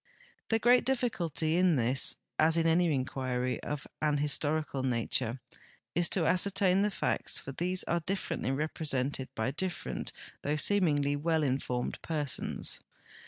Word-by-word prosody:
The 225 Hz, -, +3 dB
great 245 Hz, +3 st, +5 dB
difficulty 175 Hz, -, 0 dB
in 180 Hz, -2 st, +4 dB
this, 125 Hz, +1 st, +1 dB, 0.2 s
as 160 Hz, +1 st, +4 dB
in 165 Hz, -, +2 dB
a,ny 165 Hz, +2 st, +4 dB
inquiry 130 Hz, -2 st, -2 dB
of 145 Hz, -1 st, -4 dB, 0.2 s
an 150 Hz, -1 st, +2 dB
historical 150 Hz, 0 st, 0 dB
nature, 125 Hz, -1 st, 0 dB, 0.5 s
is 175 Hz, 0 st, +2 dB
to 175 Hz, -4 st, +1 dB
ascertain 190 Hz, +1 st, +3 dB
the 210 Hz, -, +2 dB
facts, -, -, -1 dB
for 135 Hz, -, -6 dB
these 180 Hz, +6 st, -2 dB
are 170 Hz, -, 0 dB
differently 185 Hz, -4 st, -3 dB
represented 135 Hz, -2 st, -1 dB
by 110 Hz, +4 st, -1 dB
differ 185 Hz, +4 st, -3 dB
ent -, -, -3 dB, 0.3 s
though 145 Hz, +1 st, -1 dB
seemingly 150 Hz, -5 st, +3 dB
Avell 160 Hz, +1 st, +1 dB
in 135 Hz, 0 st, +1 dB
formed 125 Hz, -2 st, -3 dB
persons. 150 Hz, -4 st, -1 dB
155 Hz, 145 wpm, -31 LUFS, 135-180 Hz, 0.5 s, great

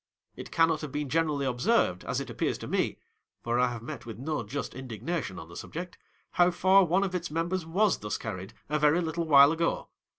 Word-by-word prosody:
It -, -, -8 dB
cannot 165 Hz, -1 st, +2 dB
have 150 Hz, -3 st, -6 dB
been 145 Hz, -1 st, -3 dB
generally 150 Hz, -2 st, +1 dB
observed, 125 Hz, -, +1 dB
as -, -, -1 dB
it -, -, -6 dB
appears -, -, -1 dB
to -, -, -8 dB
me -, -, 0 dB, 0.5 s
(for 120 Hz, +1 st, 0 dB
I 125 Hz, -, +4 dB
have 115 Hz, -2 st, -7 dB
met -, -, -7 dB
with 115 Hz, -4 st, -8 dB
no 150 Hz, +2 st, -2 dB
just 125 Hz, +6 st, -5 dB
indignation 130 Hz, -, -4 dB
on 80 Hz, -2 st, -8 dB
the 85 Hz, -, -13 dB
subject), 175 Hz, +2 st, -6 dB, 0.4 s
how 175 Hz, 0 st, +4 dB
far 190 Hz, +2 st, +5 dB
one 180 Hz, +3 st, +2 dB
of 190 Hz, -2 st, -2 dB
its 180 Hz, -1 st, -2 dB
members 165 Hz, +2 st, -2 dB
was 195 Hz, +4 st, +2 dB
thus 105 Hz, 0 st, -3 dB
carried, 95 Hz, -4 st, -6 dB
a 150 Hz, +1 st, 0 dB
very 150 Hz, +3 st, +4 dB
little 165 Hz, -1 st, -2 dB
while 140 Hz, -1 st, +8 dB
ago. 165 Hz, +1 st, -1 dB
150 Hz, 210 wpm, -28 LUFS, 125-170 Hz, 0.5 s, while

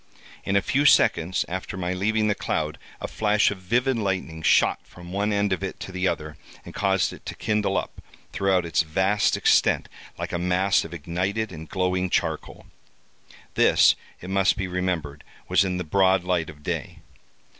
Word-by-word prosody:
In 100 Hz, -, -1 dB
a 100 Hz, -, +3 dB
few 145 Hz, +2 st, +2 dB
seconds 90 Hz, -, +3 dB
after 95 Hz, +1 st, -5 dB
my 90 Hz, 0 st, -2 dB
leaving 110 Hz, +3 st, +1 dB
the 105 Hz, -, +2 dB
cloud, 75 Hz, -5 st, -3 dB, 0.2 s
a -, -, -4 dB
flash 105 Hz, -1 st, +2 dB
of 100 Hz, -, -6 dB
vivid 120 Hz, +7 st, 0 dB
lightning 90 Hz, -5 st, -2 dB
shot -, -, +3 dB
from 90 Hz, 0 st, -13 dB
one 100 Hz, +2 st, 0 dB
end 100 Hz, -1 st, +1 dB
of 95 Hz, -, -3 dB
it 95 Hz, -, -5 dB
to -, -, -6 dB
the 90 Hz, +1 st, -1 dB
other, 75 Hz, -3 st, -3 dB, 0.3 s
and -, -, -10 dB
caused 95 Hz, -2 st, +1 dB
it -, -, -13 dB
to -, -, -5 dB
kindle 105 Hz, -2 st, 0 dB
up, -, -, -5 dB, 0.3 s
throughout 95 Hz, -2 st, +1 dB
its 85 Hz, -, +2 dB
vast 95 Hz, +6 st, +1 dB
extent, -, -, +3 dB, 0.3 s
like -, -, -5 dB
a 85 Hz, -, -1 dB
mass 90 Hz, +3 st, +2 dB
of 80 Hz, -, -9 dB
ignited 95 Hz, +7 st, -2 dB
and 80 Hz, -2 st, -9 dB
glowing 90 Hz, -1 st, 0 dB
charcoal. -, -, -2 dB, 0.9 s
This, -, -, +5 dB, 0.3 s
it 90 Hz, -, -7 dB
must 95 Hz, 0 st, +2 dB
be 95 Hz, -2 st, -2 dB
remembered, 90 Hz, -5 st, -3 dB, 0.2 s
was 90 Hz, +1 st, +4 dB
in 90 Hz, -2 st, -2 dB
the 90 Hz, -, -2 dB
broad 95 Hz, +2 st, +3 dB
light 90 Hz, -3 st, 0 dB
of 75 Hz, -1 st, -13 dB
day. -, -, -4 dB
95 Hz, 180 wpm, -24 LUFS, 90-100 Hz, 0.9 s, This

